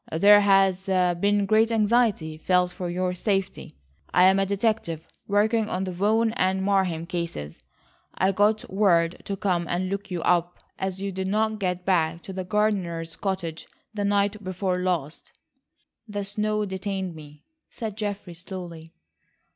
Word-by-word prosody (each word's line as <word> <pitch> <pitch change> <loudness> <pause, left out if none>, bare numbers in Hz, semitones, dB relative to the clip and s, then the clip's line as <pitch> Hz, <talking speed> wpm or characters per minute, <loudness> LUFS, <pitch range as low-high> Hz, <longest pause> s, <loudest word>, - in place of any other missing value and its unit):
"There 205 +6 +6
has 195 -1 +3
been 190 +2 +2
great 220 +3 +3
anxiety 215 -7 +2
felt 180 +3 +1
for 180 -1 -5
your 180 +1 -1
safety. 195 - -2 0.4
I 180 - +5
am 190 +1 +5
a 195 - +1
detective 200 -6 -1 0.2
working 215 +2 +2
on 185 +1 -2
the 185 - -3
Vaughan 215 +5 +2
and 190 -4 +1
Marheim 190 -5 +1
cases. 170 - -5 0.5
I 190 +1 +2
got 210 +2 +2
word 175 -4 +2
to 200 - -3
come 180 -4 0
and 185 +1 -1
look 200 +1 -4
you 175 -3 -3
up 175 0 +1 0.2
as 190 0 -3
you 200 - -2
did 190 0 -3
not 215 +2 0
get 180 -2 -2
back 170 -3 +1
to 190 - -8
the 185 0 -4
gardener's 180 -5 -1
cottage 180 -5 -4 0.3
the 205 -1 -2
night 205 +1 +1
before 185 0 -2
last." 175 -5 -3 0.7
"The 205 -1 -4
snow 210 +1 -1
detained 190 -1 -4
me," 150 -2 -13 0.3
said 220 -4 -6
Geoffrey 205 -4 -4
slowly. 170 -2 -9
190 Hz, 155 wpm, -25 LUFS, 175-205 Hz, 0.7 s, There